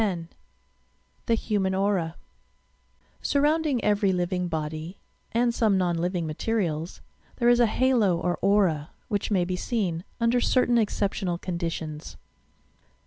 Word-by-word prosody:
X 185 -5 -1 1.1
THE 230 - +4
HUMAN 200 -4 0
AURA 190 -4 0
d - - -34 0.3
Sdrbodndinq 295 -2 +1
every 205 -2 +2
living 180 0 -1
body 160 +2 -4 0.3
(and 235 +1 +2
some 215 -4 +2
non 180 -2 +1
living 175 0 -1
materials) 165 -1 -2 0.3
there 240 -1 +3
is 240 0 +5
a 240 - +5
halo 225 -6 +2
or 175 +1 -1
"aura," 185 -6 +2 0.2
which 205 -3 -1
may 185 -4 +2
be 180 +1 -2
seen, 180 -5 -2 0.2
under 235 +1 +2
certain 245 -1 +3
exceptional 200 -4 -1
conditions. 165 -4 -5
190 Hz, 130 wpm, -26 LUFS, 170-230 Hz, 1.1 s, is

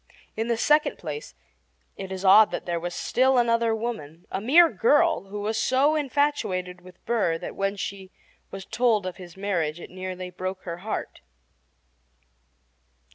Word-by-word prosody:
In 225 +1 -2
the 235 -1 0
second 300 +5 +2
place, 150 - -7 0.6
it 190 -1 -7
is 190 +1 -5
odd 205 +3 +8
that - - -5
there 170 -1 -2
was 175 +1 -5
still 260 +1 +2
another 230 -1 +2
woman 180 -9 -6
a 190 - -2
mere 320 +10 +6
girl 295 - +2
who 205 +1 -6
was 220 +2 -1
so 275 +6 +3
infatuated 270 -12 -1
with 180 0 -17
Burr 210 -9 +1
that - - -7
when 195 +1 -1
she 195 -1 -6 0.4
was 195 -1 -8
told 230 -5 +1
of 185 - -5
his 180 -1 -12
marriage 175 -5 -1
it - - -10
nearly 185 0 -6
broke 185 +1 -5
her 170 -2 -5
heart. 205 - -5
195 Hz, 160 wpm, -25 LUFS, 180-235 Hz, 0.6 s, odd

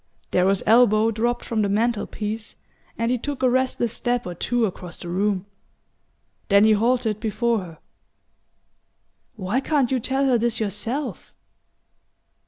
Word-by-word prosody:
Darrow's 190 +2 +2
elbow 225 -1 +5
dropped 235 +2 -1
from 225 -2 -1
the 200 - +1
mantel 220 +1 0
piece 215 +1 -5 0.4
and 230 +1 0
he 250 - 0
took 285 +1 -4
a 255 - +5
restless 255 -2 0
step 245 0 -1
or 180 - -4
two 240 +7 0
across 180 -3 -6
the - - -9
room. 195 +1 0 1.0
Then 200 0 +6
he 220 - +5
halted 225 0 +1
before 230 +1 0
her. 170 -4 -9 1.6
"Why 205 +4 -1
can't 275 -3 +1
you 260 - +2
tell 270 +3 0
her 250 -3 +3
this 235 0 0
yourself?" 225 - -4
225 Hz, 145 wpm, -23 LUFS, 205-245 Hz, 1.6 s, Then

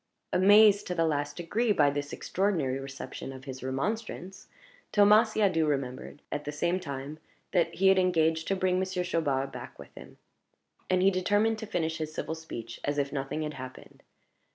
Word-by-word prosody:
Amazed 205 +2 +6
to 180 - -2
the 165 -1 +2
last 145 -2 -1
degree 210 +7 0
by 145 -7 +4
this 145 0 -4
extraordinary 165 -10 -1
reception 135 0 -7
of 130 0 -10
his 130 -2 -8
remonstrance, 190 - -4 0.4
Thomas 210 +2 +5
Siadoux 185 -7 +2
remembered, 135 0 -3
at 145 - -3
the 145 - -4
same 170 +5 0
time, 140 -2 -6 0.3
that 175 -3 +2
he 195 +1 +4
had 190 0 +5
engaged 160 -3 +2
to 195 - +1
bring 185 -1 +1
Monsieur 190 -1 -1
Chaubard 140 -6 -1
back - - -9
with - - -13
him; - - -13 0.7
and 185 0 +2
he 195 - +5
determined 205 +4 +1
to 220 - -6
finish 160 -3 -2
his 155 -1 -3
civil - - -3
speech 120 -8 -8
as 145 0 -1
if 140 0 -1
nothing 145 +2 -3
had 150 0 -4
happened. 130 -1 -10
160 Hz, 175 wpm, -29 LUFS, 145-190 Hz, 0.7 s, Amazed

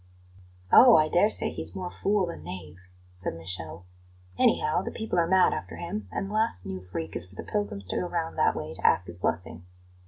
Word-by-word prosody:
"Oh, 245 -2 +9
I 155 0 +4
dare 180 +6 +4
say - - +3
he's - - -5
more 185 -2 -5
fool 200 -1 +1
than 170 - -7
knave!" 90 0 -9 0.3
said 90 -2 -4
Michele. 85 0 -6 0.5
"Anyhow, 155 - +2
the - - -4
people 220 -5 -2
are 165 - +2
mad 190 +1 +4
after - - -6
him, 205 +5 -5
and 195 - -3
the 205 - -7
last 215 - 0
new 95 -1 -5
freak 85 -3 -6
is 85 - -3
for 95 - -19
the - - -6
pilgrims 205 - -3
to - - -1
go 180 - -1
round 165 -2 -3
that - - +2
way - - -5
to - - -2
ask 90 - +3
his 85 0 -9
blessing. 85 -1 -2
155 Hz, 215 wpm, -27 LUFS, -, 0.5 s, Oh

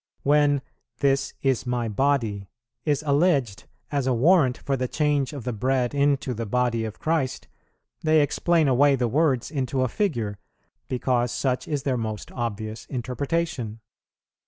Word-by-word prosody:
When 145 -1 +3 0.3
"This 135 -1 +1
is 130 -2 +1
My 120 -1 -1
Body" 110 -4 0 0.4
is 150 -1 +1
alleged 140 - +2 0.3
as 140 -3 0
a 130 - +2
warrant 135 0 +4
for 140 - -2
the 130 -1 -1
change 145 -1 0
of 140 -5 -7
the 125 - -2
Bread 125 +3 0
into 140 -2 +1
the 115 -1 -4
Body 120 0 0
of 110 - -6
Christ, 155 -5 -1 0.5
they 155 -1 +4
explain 165 +2 +2
away 140 +2 +4
the 125 -2 0
words 140 -1 +1
into 130 -3 -1
a - - +2
figure, 115 - -2 0.5
because 125 -1 0
such 130 -2 -1
is 145 -3 -2
their 130 -3 0
most 110 -2 -4
obvious 110 -2 -4
interpretation. 130 -1 -3
130 Hz, 150 wpm, -25 LUFS, 120-145 Hz, 0.5 s, warrant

